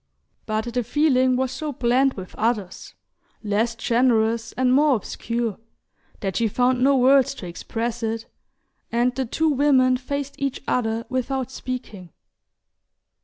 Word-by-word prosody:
But 220 +2 -2
the 245 0 0
feeling 260 0 +2
was 260 0 0
so 295 +4 -4
blent 255 +2 +2
with 185 -1 -8
others, 215 -4 -2 0.5
less 220 +3 0
generous 230 -1 +1
and 255 0 +2
more 290 0 +4
obscure, 230 0 -3 0.6
that 195 -3 -2
she 230 - +2
found 250 +3 +1
no 275 0 +4
words 265 +1 +4
to 195 - -8
express 225 +7 -4
it, 225 0 -2 0.7
and 240 +2 +2
the 260 0 -2
two 320 +7 +1
women 265 -3 +3
faced 280 +2 -4
each 275 -1 -3
other 225 -2 0
without 260 0 -2
speaking. 245 -9 -6
245 Hz, 135 wpm, -23 LUFS, 225-260 Hz, 0.7 s, more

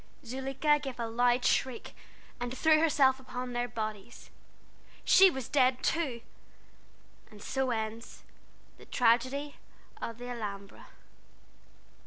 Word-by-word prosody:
Zuleika 270 +4 0
gave 270 -4 -7
a 235 - -1
loud 245 +2 +1
shriek, 260 -3 0 0.5
and 245 +1 -4
threw 315 +1 +4
herself 275 -5 +3
upon 250 -1 -6
their 240 0 -1
bodies. 215 -1 -7 0.7
She 385 0 +7
was 265 -8 -5
dead, 255 -2 +2
too! 275 -8 -1 1.1
And 210 -2 -15
so 265 +4 -2
ends 225 0 -5 0.6
the - - -14
Tragedy 255 +4 +1 0.4
of 230 - -5
the 245 +1 -8
Alhambra." 205 -4 -7
250 Hz, 115 wpm, -30 LUFS, 230-265 Hz, 1.1 s, She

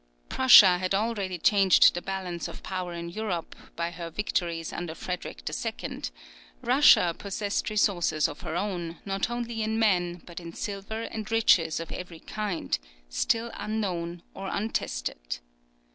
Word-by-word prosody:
Prussia 200 -8 +8
had 185 +1 0
already 200 -4 -1
changed 195 +1 +6
the 175 - -3
balance 185 -3 -4
of - - -10
power 185 -2 -4
in 170 0 -5
Europe, 180 -3 -4 0.2
by 170 +1 -2
her 170 0 -6
victories 170 -3 -2
under 170 -2 -5
Frederick 175 - -6
II.; - - -4 0.6
Russia 175 -1 +6
possessed 200 0 -2
resources 180 -7 +2
of 145 - -9
her 160 -2 -4
own, 175 -3 -3
not 195 +2 -1
only 240 -1 -3
in 220 +1 0
men, 180 -6 +1
but 170 -1 -8
in 170 -1 -9
silver 205 +4 -4
and 220 -2 -5
riches 175 -8 +4
of 165 - -6
every 180 -2 -7
kind 200 - -3 0.3
still 225 - 0
unknown 175 -6 -3
or 195 - -6
untested. - - -3
180 Hz, 145 wpm, -27 LUFS, 170-210 Hz, 0.6 s, Prussia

